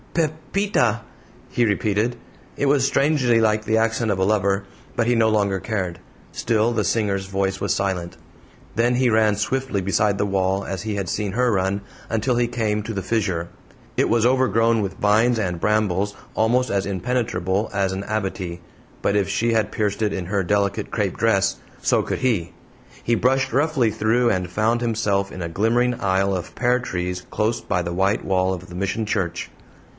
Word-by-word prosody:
"Pepita!" 155 - 0 0.5
he 120 - +1
repeated; 105 +2 +1 0.4
it 140 - 0
was 140 -1 +3
strangely 135 -4 +3
like 110 -1 +2
the 110 +1 +1
accent 115 0 +1
of 100 - 0
a 95 - +3
lover, 100 -1 +1 0.3
but 115 - +1
he 120 - +4
no 110 -1 +4
longer 100 -3 +1
cared. 95 -6 -3 0.3
Still 115 0 +1
the 105 -2 +1
singer's 100 -4 0
voice 95 0 -1
was - - +1
silent. 95 -3 -2 0.6
Then 120 +3 +2
he 125 0 +3
ran 110 -1 +3
swiftly 130 +1 -1
beside 100 +2 +1
the 100 - +1
wall, 95 0 0
as 95 -2 -4
he 110 0 -3
had 100 -2 -2
seen 100 +1 -2
her 125 +2 +2
run, 95 +1 0 0.3
until 115 +3 0
he 120 0 +2
came 110 -3 -1
to 110 - -5
the 95 -2 -3
fissure. 95 -5 -1 0.5
It - - +2
was 115 -1 +3
overgrown 115 -3 +3
with 95 -1 -4
vines 110 +4 +3
and 90 -5 -2
brambles 105 -2 +1 0.2
almost 120 +3 +2
as 100 -1 0
impenetrable 100 -1 -1
as 95 -1 0
an 95 +1 -4
abatis, 95 -5 -3 0.5
but 100 - +2
if 100 -2 +1
she 115 +3 +1
had 110 -2 +1
pierced 105 -1 -1
it 105 -1 +1
in 95 -3 -3
her 100 +2 0
delicate 100 +1 0
crape - - -1
dress, - - +2 0.2
so - - +2
could - - -3
he! 110 -10 0 0.5
He 120 - +1
brushed 130 +1 +1
roughly 140 -4 +2
through, 110 +3 +2
and 90 -1 -1
found 110 +5 +1
himself 105 -4 0
in 95 - -7
a - - -2
glimmering 115 +8 +1
aisle 95 0 +1
of 90 - -6
pear 125 +1 +2
trees 90 -6 -3
close 110 +2 0
by 90 -3 -1
the 85 0 -4
white 95 +3 +1
wall 95 -1 +1
of 90 -1 -7
the 90 - -10
Mission 100 +4 -1
church. 95 -5 -2
105 Hz, 185 wpm, -22 LUFS, 95-115 Hz, 0.6 s, he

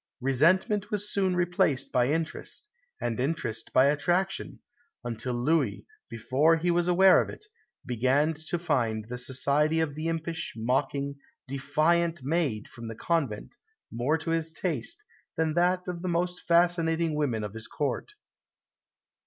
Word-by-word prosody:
Resentment 180 - +2
was 210 -1 -1
soon 190 -2 +1
replaced 175 -6 +1
by 125 -1 +3
interest, 160 - -3 0.3
and 120 0 -2
interest 125 -5 -2
by 130 - +5
attraction; 175 +7 0 0.4
until 120 +1 -3
Louis, 135 -1 0 0.2
before 135 +8 +2
he 175 +2 +1
was 175 0 +1
aware 185 +2 +6
of - - -4
it, - - -10 0.4
began 130 +6 +2
to 155 +2 -4
find 120 -10 0
the 125 0 -4
society 140 +5 +1
of 160 -3 0
the 155 +2 -4
impish, 165 0 -3
mocking, 140 +4 -1 0.3
defiant 155 +4 +1
maid 140 -7 -1
from 115 -1 -10
the 115 - -6
convent 155 - -2 0.3
more 125 +7 0
to 165 +1 -4
his 165 -1 -1
taste 160 -7 -2 0.3
than 160 -1 +1
that 180 +2 +1
of 175 -1 -4
the 185 - -4
most 180 +1 -2
fascinating 170 -1 +3
women 130 -8 -1
of 105 -1 -5
his 115 0 -6
Court. 145 - -3
155 Hz, 145 wpm, -28 LUFS, 130-170 Hz, 0.4 s, aware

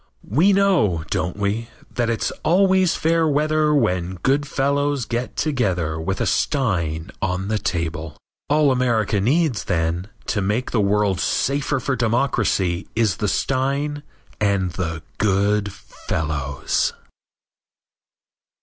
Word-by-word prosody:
We 160 - +4
know, 180 - +3
don't 90 +1 -1
we, 105 +3 -1 0.3
that 120 -1 0
it's 115 - -1
always 185 +1 +3
fair 165 0 +2
weather 155 +1 +2
when 90 - +1
good 140 +2 +2
fellows 140 -1 0
get 120 0 -3
together 90 - 0
with 95 +4 -2
a - - +1
stein 90 - 0
on 95 -1 -1
the 110 -1 0
table. 80 -4 -3 0.3
All 150 -1 +4
America 115 -5 +1
needs, 135 - +1
then, 85 +1 -1 0.2
to 105 - -1
make 105 +6 -1
the 115 - +2
world 100 -1 +1
safer 140 +1 0
for 130 +2 -1
democracy 110 -7 0
is 110 -4 +1
the 105 - -1
stein 140 +6 -1 0.4
and 100 -3 +1
the 80 -2 -4 0.2
good 100 +1 +1
fellows. 75 -7 -2
110 Hz, 120 wpm, -22 LUFS, 95-140 Hz, 0.4 s, We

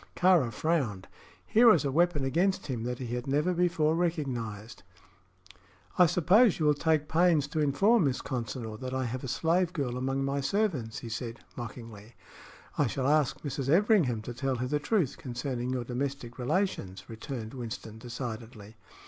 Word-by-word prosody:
Kāra 175 -9 +4
frowned. 115 - -1 0.4
Here 235 +2 +5
was 170 -9 +4
a 140 - 0
weapon 165 -2 +2
against 175 +8 +1
him 130 -6 -3
that 125 0 -3
he 120 -2 -5
had 125 +2 -4
never 150 +6 +1
before 170 -3 +2
recognized. 125 - -3 1.2
"I 180 - +8
suppose 185 +7 +4
you 155 - 0
will 150 - +5
take 155 0 +1
pains 165 -3 +3
to 160 0 -2
inform 195 +8 +3
Miss 130 -2 0
Consinor 115 -3 -5
that 130 0 -4
I 130 -1 -1
have 125 +2 -4
a - - -4
slave 165 +7 +1
girl 130 -6 -2
among 135 +1 -1
my 140 +1 -1
servants," 140 - -1
he - - -6
said, 115 +1 -5
mockingly. 115 -2 -9 0.6
"I 145 - +4
shall 130 +3 -2
ask 150 -2 +2
Mrs. 135 -2 -3
Everingham 165 - +3
to 120 - -6
tell 135 +2 -1
her 125 +1 -2
the 145 +3 0
truth 170 - 0
concerning 125 -1 -4
your 130 -1 -1
domestic 125 0 -4
relations," 125 - -2
returned 115 0 -7
Winston, 115 -3 -7
decidedly. 115 -3 -7
135 Hz, 165 wpm, -29 LUFS, 120-160 Hz, 1.2 s, I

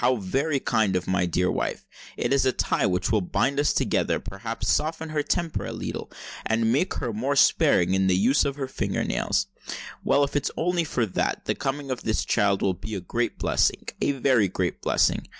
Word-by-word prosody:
How 125 +1 +3
very 135 +8 -1
kind 110 -6 +1
of 90 -1 -1
my 90 -1 +1
dear 90 +2 +1
wife: - - -3 0.3
it 120 - 0
is 140 - +3
a 130 - +3
tie - - 0
which 90 +2 0
will 110 -2 +3
bind 135 +9 0
us 145 - +3
together—perhaps 115 +4 -1
soften 160 +1 0
her 155 -1 0
temper 165 +2 -1
a - - -4
leetle—and 115 0 -3
make 150 +8 +1
her 120 - -3
more 130 +7 -1
sparing 90 -8 +4
in 95 0 +2
the 90 - +3
use 125 +9 +3
of 140 -1 -1
her 135 -2 -4
finger 130 - -2
nails. 100 0 0 0.6
Well—if 140 0 +2
it's 145 0 +1
only 175 0 +1
for 125 -6 0
that, 95 - -2
the - - +1
coming 135 0 -3
of 130 - -3
this 110 - -1
child 100 -3 +2
will 95 - +2
be 110 +4 -7
a - - -2
great 115 +7 -2
blessing—a - - 0
very 130 -6 +3
great 90 -1 -2
blessing. - - +1
120 Hz, 195 wpm, -25 LUFS, 95-140 Hz, 0.6 s, sparing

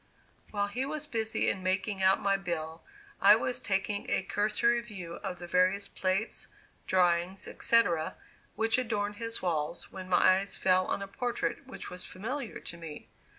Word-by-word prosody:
While 205 -1 0
he 235 +6 -3
was 300 +2 -3
busy 225 -6 0
in 190 - 0
making 190 +2 -1
out 190 +1 +5
my 200 0 +2
bill, 170 -4 -4 0.4
I 205 +2 +9
was 245 +2 -1
taking 200 -2 -1
a - - +1
cursory 215 +4 +2
view 185 -7 -8
of 180 - -5
the 175 - -8
various 185 +3 +2
plates, 190 +4 -1 0.4
drawings, 180 0 +2
etc., 175 -9 +2 0.4
which 225 +2 +3
adorned 210 -4 -1
his 230 -2 -4
walls, 165 -2 -1
when 185 -1 -8
my 185 +1 +5
eyes 200 0 -4
fell 185 0 +3
on 200 - -1
a - - -6
portrait 245 +5 -2
which 265 - -8
was 180 0 -6
familiar 235 +6 -5
to 170 - -7
me. 160 -3 -9
195 Hz, 165 wpm, -30 LUFS, 185-225 Hz, 0.4 s, I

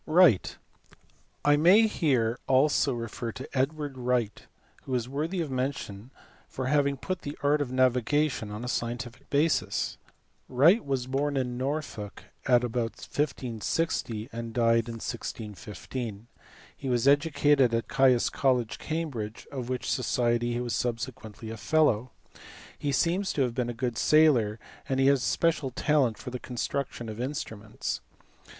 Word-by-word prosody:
Wright*. 160 - +4 0.9
I 145 0 +5
may 185 +9 +6
here 125 - +1
also 140 +1 +3
refer 115 0 -4
to 130 - -7
Edward 140 0 -1
Wright, 120 -4 -1 0.4
who 130 - -2
is 120 -1 -1
worthy 155 +7 -2
of 155 -4 -4
mention 130 -5 -3 0.4
for 130 - -4
having 140 0 +2
put 185 +6 -4
the 145 - -6
art 145 +1 +3
of 130 -3 -2
navigation 130 0 +1
on 105 +3 -6
a - - -4
scientific 120 +2 -4
basis. 150 +3 +1 0.5
Wright 165 - +5
was 135 -3 -1
born 140 +2 -1
in 125 -2 -1
Norfolk 130 -6 -4 0.2
about 120 -2 +1
1560, 125 -3 -2
and 115 0 -5
died 115 -1 +3
in 115 - -5
1615. 110 0 -6 0.5
He 135 - -5
was 120 +1 +1
educated 145 -3 +4
at 115 -2 -1
Caius 130 -3 +3
College, 125 -4 +1
Cam 160 0 -3
bridge, 110 -3 -6
of 130 -3 -5
which 130 -1 -3
society 120 -1 +1
he 120 - -1
was 120 -1 -3
subsequently 115 -3 -4
a 115 - -6
fellow. 125 -2 +2 0.7
He 145 - -2
seems 175 +8 +1
to 140 - +2
have 125 -2 -1
been 125 -1 -1
a - - -1
good 120 0 -3
sailor 130 -9 +4 0.3
and 135 0 0
he 135 - +4
had 140 0 +5
a - - -8
special 155 +2 +1
talent 130 -3 +1
for 125 - -7
the 125 - -4
construction 125 0 -4
of 110 +1 -5
instruments. 110 -6 -4
130 Hz, 150 wpm, -28 LUFS, 115-145 Hz, 0.9 s, may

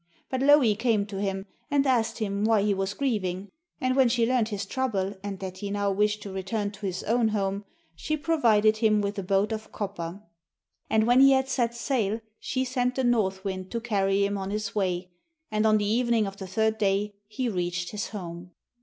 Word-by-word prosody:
But 260 -1 -1
Louhi 275 -6 +5
came 225 -2 +1
to 200 -1 -7
him 195 -1 -2 0.2
and 285 -1 +2
asked 245 -4 +1
him 200 -2 -2
why 220 -2 +3
he 205 -1 +2
was 195 +1 -2
grieving, 200 -8 -2 0.3
and 255 0 +1
when 265 -3 +5
she 235 -1 +2
learned 240 -2 +1
his 200 -2 -3
trouble, 200 -5 -1
and 200 -1 -5
that 185 -1 -6
he 205 - -4
now 200 0 0
wished 210 +1 +1
to 200 - -7
return 200 +2 -2
to 200 0 -6
his 185 -1 -4
own 230 +1 +2
home, 200 -1 -1 0.3
she 310 - -2
provided 225 -9 +3
him 215 -2 +3
with 200 0 -2
a - - -1
boat 195 +3 +1
of 220 0 -5
copper. 195 -2 -5 0.7
And 220 0 +3
when 245 +2 +5
he 275 0 +8
had 265 0 +2
set 235 -3 0
sail 230 -4 0 0.2
she 260 0 -1
sent 250 0 0
the 265 - 0
north 200 -6 +1
wind 190 -1 -4
to 235 - -2
carry 200 -3 +1
him 200 0 -2
on 190 0 -4
his 210 0 -3
way, 185 -3 -1 0.4
and 215 +1 +2
on 215 0 +5
the 205 - 0
evening 230 0 +2
of 195 0 -6
the 190 - -7
third 220 +3 0
day 205 0 +1
he 230 +4 -3
reached 175 -4 -2
his 210 -1 -3
home. 175 -3 -7
210 Hz, 210 wpm, -27 LUFS, 195-235 Hz, 0.7 s, he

